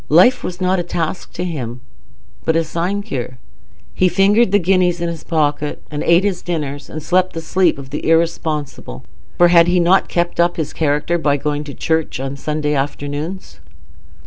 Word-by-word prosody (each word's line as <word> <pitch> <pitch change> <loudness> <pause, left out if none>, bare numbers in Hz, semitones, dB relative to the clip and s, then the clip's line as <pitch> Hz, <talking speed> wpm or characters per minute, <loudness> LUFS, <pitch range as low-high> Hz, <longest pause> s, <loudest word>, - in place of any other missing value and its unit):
Life 185 - +5
was 180 0 -5
not 185 0 +1
a - - -1
task 170 +1 -3
to 175 - -4
him, 130 -9 -4 0.6
but 160 - +1
a 165 - +3
sinecure. 165 -7 -3 0.6
He 185 - +3
fingered 200 +3 +3
the 205 - +5
guineas 180 -2 +2
in 170 0 -1
his 165 -2 -6
pocket, 150 -2 -1
and 150 0 -3
ate 170 +2 +4
his 195 -3 -1
dinners, 145 -5 -4
and 155 -1 -7
slept 185 +2 +1
the 165 - -4
sleep 170 +1 +1
of 135 -1 -10
the 150 - -3
irresponsible, 155 - -1 0.3
for 175 0 +6
had 170 -1 +6
he 180 +1 +3
not 175 +3 +3
kept 175 0 -1
up 175 0 +2
his 155 -2 -3
character 155 +3 0
by 145 -3 +2
going 150 +1 -2
to 140 - -8
church 160 -4 -1
on 135 0 -3
the 140 - -7
Sunday 150 -1 -1
afternoons? 145 +5 -4
165 Hz, 185 wpm, -18 LUFS, 150-180 Hz, 0.6 s, for